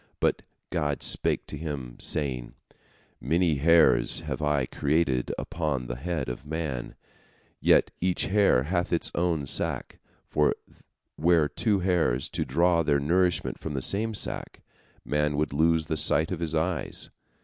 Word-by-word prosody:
But - - +1 0.3
God 75 -1 -1
spake - - +2
to - - -6
him, 70 -5 -6
saying: 65 -5 -2 0.6
"Many 80 +3 +1
hairs 85 +3 +4
have - - -5
I 75 -3 +1
created 70 -2 0
upon 75 -6 -2
the - - -5
head 85 +6 -3
of 60 +3 -5
man, 75 -5 -4 0.6
yet - - +4
each 90 0 +1
hair 100 -10 +3
hath 85 +4 -1
its 85 - 0
own 85 -4 0
sac, - - -1 0.3
for 75 0 +2 0.6
were 80 -1 +4
two 100 +4 0
hairs 85 -9 +1
to - - -2
draw 85 +4 +2
their 75 -3 +2
nourishment 90 +5 +1
from 75 -2 -5
the 65 - -2
same 110 +2 0
sac, - - -4 0.4
man 75 0 0
would 75 -1 -1
lose 80 +1 +2
the 80 0 -2
sight 80 +2 +2
of 90 - -3
his 80 -1 -1
eyes. 80 0 -2
80 Hz, 150 wpm, -27 LUFS, 70-85 Hz, 0.6 s, hairs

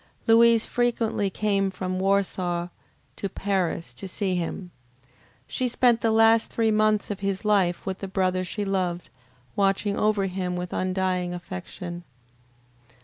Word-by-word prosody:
Louise 230 0 +5
frequently 230 -4 0
came 195 0 0
from 185 -1 -4
Warsaw 185 -3 0 0.5
to 200 - -4
Paris 190 -4 -2
to 195 - -8
see 190 +1 -2
him. 180 +1 -3 0.7
She 255 - -2
spent 240 -1 +3
the 230 - +2
last 225 0 +4
three 225 -1 +1
months 215 -1 +2
of 200 - -4
his 195 +1 -2
life 195 -5 +2
with 190 -1 -3
the 195 - -5
brother 185 -1 0
she 205 +3 -4
loved, 180 -3 -2 0.4
watching 200 +1 +1
over 210 -2 +2
him 180 -1 -3
with 180 0 -5
undying 185 -1 -1
affection. 175 - -7
195 Hz, 140 wpm, -25 LUFS, 180-215 Hz, 0.7 s, Louise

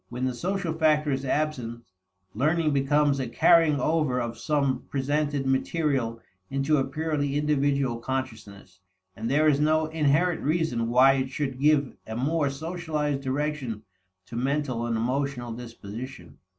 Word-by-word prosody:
When 125 +1 -3
the 130 - -1
social 180 +4 -2
factor 155 -2 +2
is 135 0 -1
absent, 130 -5 -2 0.5
learning 155 +5 +1
becomes 140 +1 +2
a 130 - -2
carrying 160 +3 +4
over 150 -3 +1
of 120 -1 -3
some 140 0 0
presented 145 0 -1
material 135 -3 0 0.3
into 135 +3 +1
a 135 - +2
purely 145 -1 -2
individual 140 -4 +1
consciousness, 110 -7 -6 0.4
and 110 +2 -4
there 150 +3 +3
is 145 -2 +4
no 155 +1 +3
inherent 160 +2 +1
reason 150 -7 0
why 130 +3 +6
it 130 -1 -1
should 135 -1 -3
give 145 -1 +2
a 110 - -5
more 145 +4 +1
socialized 155 -1 -3
direction 135 -5 -3 0.4
to - - -10
mental 130 -2 -1
and 115 -1 0
emotional 125 +1 -2
disposition. 120 +2 -9
140 Hz, 140 wpm, -26 LUFS, 125-150 Hz, 0.5 s, why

